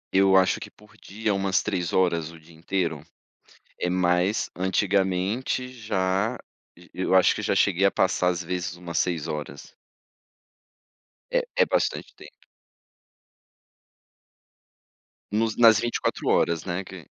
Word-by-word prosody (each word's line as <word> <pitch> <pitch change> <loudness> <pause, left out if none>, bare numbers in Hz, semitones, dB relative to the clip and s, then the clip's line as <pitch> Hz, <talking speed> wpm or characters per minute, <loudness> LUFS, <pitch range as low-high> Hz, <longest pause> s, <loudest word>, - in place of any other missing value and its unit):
Eu 95 0 +5
acho 95 - +3
que - - -8
por 105 0 -21
dia 105 +1 -3
umas 95 -1 0
3 90 -2 -2
horas 85 -3 +1
o 85 - -14
dia 80 +1 -19
inteiro, 85 +1 -2 0.8
eh, 90 - -1
mas 90 +3 +1
antigamente 95 +6 0
já 100 -5 -1 0.4
j 90 +1 -18
eu 95 0 -2
acho 95 - +5
que - - -4
já - - +1
cheguei 100 0 +2
a 100 - +4
passar 90 -1 +1
às 90 0 -2
vezes 90 0 -4
umas 85 -1 -6
6 85 -3 0
horas. 75 -2 -7 1.6
É, - - +2 0.2
é - - 0
bastante - - -1
tempo. - - -16 2.9
Nos 110 +1 0
nas 115 -2 +7
24 120 0 -2
horas, 85 -1 +2
né, 95 +1 -3
que 95 -2 -11
95 Hz, 135 wpm, -25 LUFS, 85-100 Hz, 2.9 s, nas